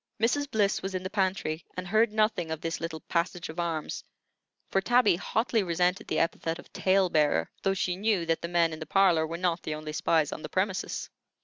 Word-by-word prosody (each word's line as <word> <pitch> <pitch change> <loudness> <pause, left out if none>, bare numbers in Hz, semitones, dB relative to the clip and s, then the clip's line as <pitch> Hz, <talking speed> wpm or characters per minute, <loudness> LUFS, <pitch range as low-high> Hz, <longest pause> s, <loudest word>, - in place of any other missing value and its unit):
Mrs. 275 +6 +1
Bliss 205 -4 +1
was 190 0 -4
in 185 - -2
the 185 - -5
pantry, 185 -5 -1
and 185 0 -4
heard 220 +3 +3
nothing 215 -6 +1
of 160 -1 -3
this 165 0 -3
little 165 -2 -4
passage 175 0 -2
of 160 +2 -7
arms; 165 -3 -2 0.7
for 195 - +2
Tabby 240 -3 +4
hotly 225 +5 0
resented 180 0 0
the - - -1
epithet 165 0 0
of 175 - -15
"tale 190 0 +3
bearer," 150 - +2
though 195 0 +1
she 180 -1 0
knew 200 -3 +1
that 165 0 0
the 170 - -3
men 170 -1 +2
in 155 - -7
the 155 - -7
parlor 175 -4 +4
were 165 +1 -4
not 175 -1 0
the 155 - -3
only 155 0 -6
spies 155 -1 +2
on - - -6
the 155 - -6
premises. 190 +2 -1
180 Hz, 215 wpm, -28 LUFS, 165-195 Hz, 0.7 s, Tabby